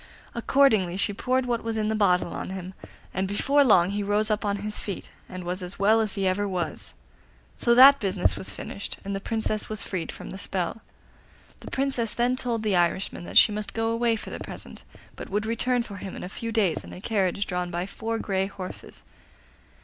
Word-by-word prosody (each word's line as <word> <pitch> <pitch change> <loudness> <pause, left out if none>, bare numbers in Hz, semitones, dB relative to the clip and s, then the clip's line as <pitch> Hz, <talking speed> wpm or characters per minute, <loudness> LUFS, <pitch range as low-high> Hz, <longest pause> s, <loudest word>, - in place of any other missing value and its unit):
Accordingly 220 -8 +3
she 205 +1 0
poured 255 +5 0
what 240 -2 -1
was 225 -1 -2
in 215 -1 0
the 220 - +1
bottle 180 -5 +2
on - - -5
him, 190 0 -6 0.4
and 190 +1 0
before 275 +9 +3
long 190 -7 +5
he 205 +1 -1
rose 205 +2 +1
up 210 +1 0
on 200 -1 0
his 210 0 +1
feet, 200 - -5 0.2
and 185 -1 -7
was 180 +2 -3
as 180 +1 -4
well 215 +3 +4
as 215 -1 -2
ever 195 +1 +1
he - - -3
was. 175 -5 -4 0.6
So 235 - +3
that 275 +3 +9
business 190 -4 +1
was - - -4
finished, 200 - -6
and 200 0 -2
the - - -2
Princess 220 -1 -2
was 215 -1 -1
freed 185 -4 -3
from - - -9
the 190 - -7
spell. 190 +4 -3 0.8
The - - -9
Princess 265 -4 0
then 245 +1 +2
told 235 -3 -2
the 210 -3 +1
Irishman 175 +1 0
that - - -1
she - - +8
must 210 -1 -4
go 225 0 0
away 230 0 +2
for - - -7
the - - -5
present, - - -8 0.3
but - - -8
would 210 +2 -1
return 240 +2 0
for 200 -4 -9
him 190 0 -7
in - - -7
a 180 - -5
few 230 +3 -5
days 200 -8 +1
in - - -10
a - - -8
carriage 200 -1 0
drawn 180 -1 -2
by 175 +1 -2
four 225 +3 -4
grey 195 -3 -1
horses. 195 -2 -9
205 Hz, 215 wpm, -26 LUFS, 190-225 Hz, 0.8 s, that